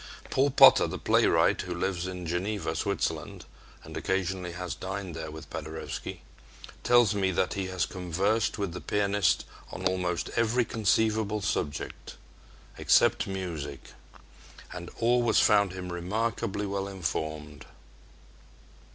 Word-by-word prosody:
Paul 135 +2 +3
Potter, 135 - +7
the - - -5
playwright, - - +3
who 90 - -5
lives 90 0 -2
in 90 -1 -6
Geneva, 90 0 -2
Switzerland, 80 -7 -2 0.4
and - - -10
occasionally 95 -2 -2
has 90 -2 -4
dined 95 0 -5
there 80 -1 -5
with 80 +1 -10
Paderewski, 80 0 -6 0.6
tells 120 -4 +4
me 100 -2 +1
that 90 +1 0
he 95 -2 -3
has 95 -2 -1
conversed 95 +5 -1
with 100 -4 -2
the 90 - -6
pianist 100 -2 +1 0.3
on 95 - -6
almost 90 -2 -1
every 115 +1 +2
conceivable 110 -1 +1
subject 75 -6 -3 0.6
except - - +4
music 85 -8 -5 0.8
and 85 -1 -7
always 120 0 +3
found 100 -2 +4
him 90 -1 -6
remarkably 105 +3 -2
well 100 0 -2
informed. 80 -5 -4
95 Hz, 125 wpm, -28 LUFS, 85-105 Hz, 0.8 s, Potter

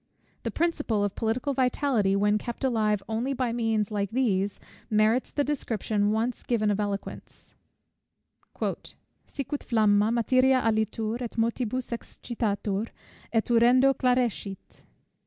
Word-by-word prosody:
The - - -3
principle 295 -11 0
of 205 -1 -1
political 240 +6 -1
vitality, 250 -6 +1
when 205 +1 +2
kept 240 +3 -6
alive 215 -5 +1
only 230 +5 -1
by 250 -3 -1
means 225 -3 0
like 200 -2 -1
these, 205 -5 0 0.3
merits 215 +3 +2
the 290 - 0
description 215 -7 -1
once 230 +3 -1
given 215 -3 +1
of 205 - -1
eloquence: 205 -1 -5 1.1
"Sicut 285 +1 -6
flamma, 215 -2 +3
materia 255 +3 +3
alitur, 220 +1 0
& - - -16
motibus 235 +2 -1
excitatur, 220 -3 -3 0.3
& - - -15
urendo 245 +4 +4
clarescit." 245 -6 -1
225 Hz, 120 wpm, -27 LUFS, 210-250 Hz, 1.1 s, urendo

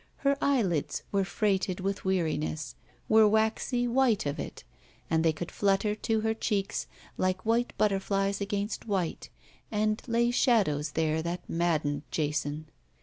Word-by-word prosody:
Her 280 0 +4
eyelids 200 - +1
were 200 -1 +2
freighted 190 -2 0
with 195 +1 -2
weariness, 160 -4 -1 0.3
were 220 0 +6
waxy 220 +3 +1
white 240 - +2
of 145 +2 -2
it, - - -6 0.5
and 160 0 +3
they 165 - +4
could 160 +2 -6
flutter 200 +1 +1
to 220 +1 -1
her 220 0 +1
cheeks, 205 -2 -1 0.3
like 185 +1 0
white 235 +2 +1
butterflies 195 -1 +1
against 200 +3 -3
white, 190 -5 -2 0.4
and 215 0 0
lay 235 0 +2
shadows 165 - +2
there 160 0 +1
that 170 +2 -4
maddened 155 -4 0
Jason. 150 0 -2
195 Hz, 140 wpm, -29 LUFS, 165-220 Hz, 0.5 s, were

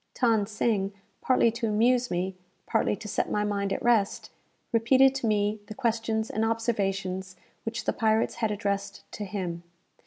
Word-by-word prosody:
Than 225 -5 +3
Sing, 205 -2 0 0.3
partly 250 -3 +3
to 230 0 -2
amuse 240 +4 +3
me, 180 +2 -2 0.3
partly - - +1
to 210 - -9
set - - -1
my 210 - 0
mind 200 -1 -1
at - - -2
rest, 225 -4 +2 0.4
repeated 260 +4 +5
to 265 -4 -2
me 210 0 +1
the 215 - -8
questions 225 -1 -1
and 220 - 0
observations 195 -5 -1 0.3
which 225 0 -3
the - - +1
pirates 220 -1 +1
had 220 - +2
addressed 200 -1 -2
to 210 - -5
him. 185 -4 -4
215 Hz, 160 wpm, -27 LUFS, 200-230 Hz, 0.4 s, repeated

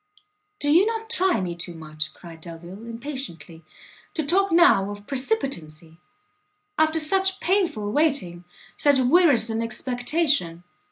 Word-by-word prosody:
"Do 290 - +1
you 355 +7 +5
not 450 0 -3
try 380 - +2
me 175 -2 -3
too 175 0 -7
much," 155 -1 -5
cried 165 -2 -13
Delvile, 175 +6 -10
impatiently, 230 - -7 0.5
"to 315 - -1
talk 385 +5 +2
now 330 - +5
of 205 0 -9
precipitancy! 175 - -3 0.8
after 315 -1 +2
such 380 +4 +1
painful 335 - 0
waiting, 265 - 0 0.3
such 285 -2 +4
wearisome 255 -5 +4
expectation! 245 - -1
255 Hz, 120 wpm, -24 LUFS, -, 0.8 s, you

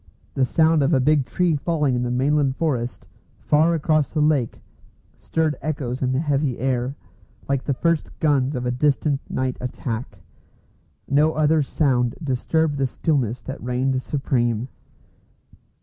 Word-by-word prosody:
The 130 - +2
sound 160 +3 +3
of 140 +3 +3
a - - +3
big 140 0 +2
tree 175 +5 +1
falling 150 -2 0
in 125 - 0
the 125 - -1
mainland 135 +2 +1
forest, 125 -6 -2 0.3
far 160 +3 +2
across 155 -2 +1
the 155 - -1
lake, 150 -6 +1 0.6
stirred 160 -2 -1
echoes 135 -5 -3
in 130 -1 +1
the 130 - +1
heavy 145 -4 0
air, 130 +1 -1 0.5
like 135 -1 0
the 140 - 0
first 165 +2 -1
guns 145 -2 +2
of 125 -1 -3
a 125 - 0
distant 140 +2 +1
night 130 -1 -2
attack. 125 -1 -5 0.9
No 150 +3 +3
other 155 +1 +3
sound 130 -4 +1
disturbed 145 +3 0
the 135 - +2
stillness 125 -5 -1
that 135 - -7
reigned 130 +1 0
supreme. 120 -4 -1
140 Hz, 150 wpm, -22 LUFS, 125-150 Hz, 0.9 s, sound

